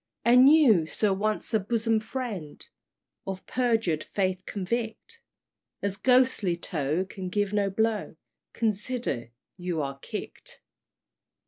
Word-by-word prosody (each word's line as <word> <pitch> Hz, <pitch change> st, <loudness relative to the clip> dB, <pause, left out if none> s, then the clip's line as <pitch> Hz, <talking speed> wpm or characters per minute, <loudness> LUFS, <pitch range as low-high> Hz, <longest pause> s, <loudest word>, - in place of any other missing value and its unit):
"And 250 Hz, +4 st, +7 dB
you, 230 Hz, -, +5 dB
Sir 205 Hz, +4 st, +1 dB
once 215 Hz, +3 st, -2 dB
a 220 Hz, -, +4 dB
bosom 225 Hz, +2 st, +1 dB
friend 215 Hz, -, -6 dB, 0.6 s
Of 190 Hz, -1 st, -5 dB
perjured 225 Hz, -11 st, 0 dB
faith 185 Hz, -1 st, -2 dB
convict, 225 Hz, -, -4 dB, 0.6 s
As 200 Hz, -1 st, -1 dB
ghostly 250 Hz, -5 st, +3 dB
toe 155 Hz, +2 st, -1 dB
can 190 Hz, -1 st, -7 dB
give 205 Hz, +1 st, -1 dB
no 205 Hz, -1 st, +2 dB
blow, 220 Hz, -2 st, -1 dB, 0.4 s
Consider 215 Hz, -, -2 dB, 0.3 s
you 180 Hz, -3 st, -3 dB
are 140 Hz, -2 st, -3 dB
kick'd. -, -, -8 dB
205 Hz, 115 wpm, -27 LUFS, 185-230 Hz, 0.6 s, And